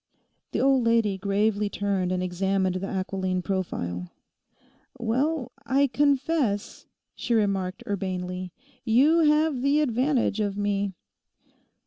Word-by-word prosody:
The - - -1
old 270 -2 +3
lady 230 -4 +2
gravely 205 +1 +1
turned 195 -3 -1
and 185 0 -1
examined 190 +1 0
the 195 +1 -4
aquiline 185 -1 -2
profile. 90 - -3 0.9
'Well, 255 +3 -1
I 280 0 +3
confess,' 280 -5 0 0.3
she 235 - -1
remarked 200 0 0
urbanely, 185 -3 -3 0.3
'you 270 +9 +4
have 300 -3 +3
the 280 +3 +3
advantage 255 -4 +1
of 205 -2 -1
me. 200 -1 -1
205 Hz, 110 wpm, -26 LUFS, 190-260 Hz, 0.9 s, you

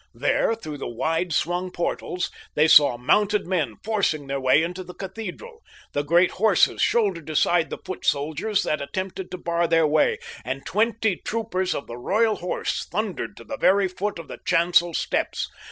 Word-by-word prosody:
There, 225 - +1
through 155 -9 -8
the - - -4
wide 165 +8 -1
swung 175 +4 0
portals, 180 +1 -3 0.2
they 150 +1 +4
saw 145 -6 +7
mounted 205 - +2
men 155 - -1
forcing 200 -9 0
their 135 0 -3
way 130 +4 +4
into 180 +2 -4
the 180 0 -11
cathedral. 225 - -8 0.3
The 145 - +1
great 170 +5 +3
horses 205 -1 +3
shouldered 190 -9 +1
aside 165 +2 +2
the - - -5
foot 185 - -6
soldiers 160 +9 0
that 150 - -1
attempted 185 +5 -5
to 185 - -6
bar 170 -1 0
their 165 -1 +3
way, 150 0 +2 0.3
and 130 +3 -5
twenty 220 -2 +1
troopers 210 -5 -2
of - - -4
the 120 - -8
Royal 215 - +1
Horse 180 - -3
thundered 205 0 -3
to - - -11
the 280 - -6
very 195 -3 +4
foot 195 +2 -3
of 165 -2 -9
the - - -9
chancel 170 0 +3
steps. - - -1
180 Hz, 175 wpm, -24 LUFS, 155-200 Hz, 0.3 s, saw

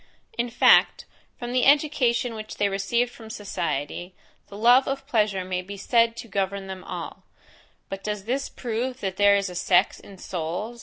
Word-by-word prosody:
In 240 0 -1
fact, 235 - +4 0.3
from 240 -1 -5
the 250 -1 +2
education 275 -5 +3
which 215 -1 -7
they 205 - +2
receive 235 +5 0
from 225 -2 -12
society, 175 -4 -4 0.3
the 200 - -10
love 245 +4 +5
of 275 0 -3
pleasure 210 -5 0
may 185 0 -2
be 200 +2 -9
said 230 +3 +2
to 235 - -7
govern 195 -1 -2
them 190 -1 -8
all; - - -7 0.7
but 195 0 -7
does 210 -2 -3
this 260 +6 -2
prove 245 +2 -4
that 190 -1 -3
there 205 0 +5
is 200 0 0
a 180 - -7
sex 180 0 +2
in 195 - -14
souls? 180 +7 -5
210 Hz, 175 wpm, -25 LUFS, 195-240 Hz, 0.7 s, love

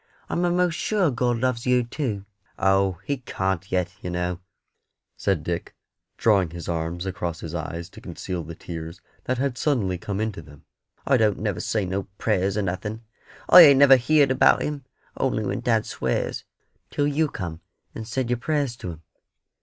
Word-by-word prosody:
I'm 175 - 0
a'most 175 0 +2
sure 195 -8 +1
God 120 -1 0
loves 125 0 -1
yer 125 -1 +4
too." 115 -5 -3 0.3
"Oh, 95 -1 +2
He 140 - -1
can't 95 -6 -3
yet, 90 -1 0
yer 90 - -4
know," 90 0 -2 0.8
said 95 -6 0
Dick, 85 +1 -4 0.4
drawing 100 -6 +3
his 85 0 -8
arms 85 +1 -2
across 90 -3 -4
his 80 - -6
eyes 85 0 -4
to - - -13
conceal 90 -3 -5
the 80 +1 -8
tears 85 +1 -7 0.3
that 130 - 0
had 130 -1 -1
suddenly 100 - 0
come 100 +1 -4
into 110 -5 -2
them. 75 -2 -16 0.4
"I 135 -1 +4
don't 110 -3 +2
never 105 -4 -2
say 110 -3 -1
no 95 +2 -3
prayers 100 -3 +1
nor 105 - 0
nothing. 100 +5 -4 0.4
I 180 - +11
ain't 140 -5 +9
never 135 -1 +8
heerd 140 +2 +3
about 130 - +4
Him, 145 -3 -4 0.3
only 120 -5 0
when - - -2
dad 115 -3 +1
swears, - - -2 0.4
till 145 - 0
you 150 +2 +2
come 85 - -6 0.3
and 110 - -7
said 125 +1 -2
your 125 - +2
prayers 140 -2 -1
to 90 - -6
Him." 80 +1 -15
105 Hz, 175 wpm, -24 LUFS, 90-130 Hz, 0.8 s, I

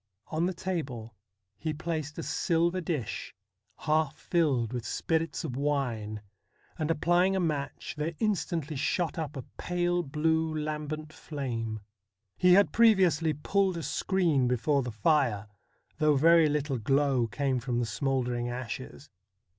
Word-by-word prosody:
On 160 +3 0
the 185 - -2
table 135 -12 -4 0.5
he 155 -1 -2
placed 155 -2 -4
a 165 - -4
silver 170 +2 +1
dish 155 - -4 0.5
half 155 -1 +1
filled 135 -9 +1
with 120 -2 -3
spirits 165 +8 -1
of 140 -7 -4
wine, 120 -7 -2 0.6
and 155 0 -1
applying 175 +4 +3
a - - +1
match, 150 -5 -2
there 155 +2 -3
instantly 170 -7 -1
shot 165 +4 -1
up 150 -2 -4
a 130 - -5 0.2
pale 175 0 0
blue, 160 +1 0
lambent 155 0 -4
flame. 115 -7 -4 0.5
He 180 - +5
had 200 +2 +5
previously 185 - +4
pulled 190 +5 +1
a 165 - -4
screen 165 -11 +1
before 130 +4 +2
the 125 - -4
fire, 115 -3 +2 0.5
though 155 -2 +4
very 165 +2 +6
little 145 -3 -1
glow 135 0 +2
came 130 +2 -1
from 120 0 -2
the 120 - +1
smouldering 125 0 -1
ashes. 120 - -6
150 Hz, 140 wpm, -29 LUFS, 130-165 Hz, 0.6 s, very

